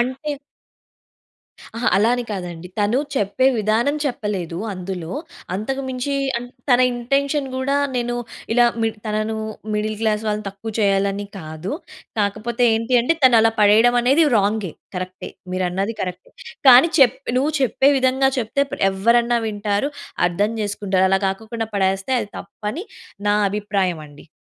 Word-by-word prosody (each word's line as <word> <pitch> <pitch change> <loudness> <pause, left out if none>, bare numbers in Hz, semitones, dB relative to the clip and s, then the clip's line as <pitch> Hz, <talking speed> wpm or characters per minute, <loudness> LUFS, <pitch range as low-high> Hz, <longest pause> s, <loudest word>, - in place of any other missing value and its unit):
అంటే 260 +5 -2 1.4
అహా! 235 - +1
అలా 210 +3 +4
అని 245 -1 -3
కాదండి. 180 -4 -5
తను 210 +5 +2 0.2
చెప్పే 230 +2 +1
విధానం 220 +7 +1
చెప్పలేదు, 205 - -3 0.2
అందులో. 180 -3 -5 0.4
అంతకు 265 +8 -3
మించి 260 +2 -2 0.2
అంట్ 245 +1 -9 0.2
తన 245 0 +6
ఇంటెన్షన్ 275 +4 0
కూడా 260 +2 0 0.2
నేను 240 -1 -1 0.4
ఇలా 240 +1 +5 0.2
మిడి 225 0 0
తనను 215 +1 -1 0.4
మిడిల్ 215 +1 -1
క్లాస్ 215 -1 +1
వాళ్ళని 210 0 -1
తక్కువ 200 +3 -7
చేయాలి 200 -1 +3
అని 205 +1 -5
కాదు. 160 - -6 0.5
కాకపోతే 215 +4 0
ఏంటి 230 +2 +2
అంటే 250 +8 +2
తను 250 -3 +7
అలా 225 0 +3
పడేయడం 220 +4 +5
అనేది 275 +7 +4
రాం‌గే. 205 -3 0 0.2
కరెక్టే. 185 0 -6 0.2
మీరు 185 0 -1
అన్నది 195 +5 -1
కరెక్టే. 180 0 -6 0.4
కానీ 255 +5 +9
చెప్ 265 -3 +6 0.2
నువ్వు 290 +4 +1
చెప్పే 265 +2 +3
విధంగా 265 +1 +2
చెప్తే‌ 250 +4 0
ప్ - - 0 0.2
ఎవ్వరన్నా 235 +5 +2
వింటారు. 205 +4 -1 0.4
అర్థం 200 +5 0
చేసుకుంటారు. 200 -2 0
అలా 195 - +3
కాకొకుండా 220 +3 -3
పడేస్తే 195 +4 0
అది 205 - -6
తప్పని 230 - -6 0.4
నా 205 - +4 0.2
అభిప్రాయం 200 -4 -1
అండి. 145 0 -16
215 Hz, 145 wpm, -21 LUFS, 195-245 Hz, 1.4 s, కానీ